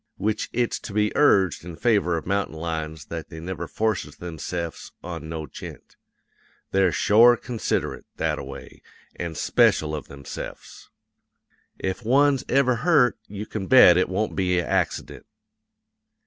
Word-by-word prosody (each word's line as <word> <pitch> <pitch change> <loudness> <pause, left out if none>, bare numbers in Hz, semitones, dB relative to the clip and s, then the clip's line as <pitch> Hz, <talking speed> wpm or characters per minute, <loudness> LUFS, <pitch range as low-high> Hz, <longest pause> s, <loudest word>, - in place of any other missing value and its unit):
Which 105 +2 -1
it's 120 0 -1
to 100 - -9
be 105 0 +1
urged 95 - +3
in 85 -1 -8
favor 90 -5 +2
of 80 - -6
mountain 100 -3 -1
lions 80 -2 -4
that 80 0 -7
they 80 - -9
never 85 0 -5
forces 110 0 -2
themse'fs 85 0 -6
on 80 - -6
no 80 -1 -4
gent; 70 - -11 0.8
they're 95 -2 +3
shore 120 +6 +5
considerate, 120 -3 -3
that - - -1
a - - -6
way, - - -10 0.4
an' 85 -2 -4
speshul 75 +1 +2
of 75 - -7
themse'fs. 70 0 -9 0.9
If 95 +5 -3
one's 135 +3 +3
ever 130 -2 +3
hurt, 140 -4 +3
you 105 +1 -6
can 105 -3 -5
bet 130 -9 +8
it 90 - +2
won't 105 +3 -1
be 90 -2 +1
a 85 - 0
accident. - - -2
95 Hz, 150 wpm, -24 LUFS, 85-110 Hz, 0.9 s, bet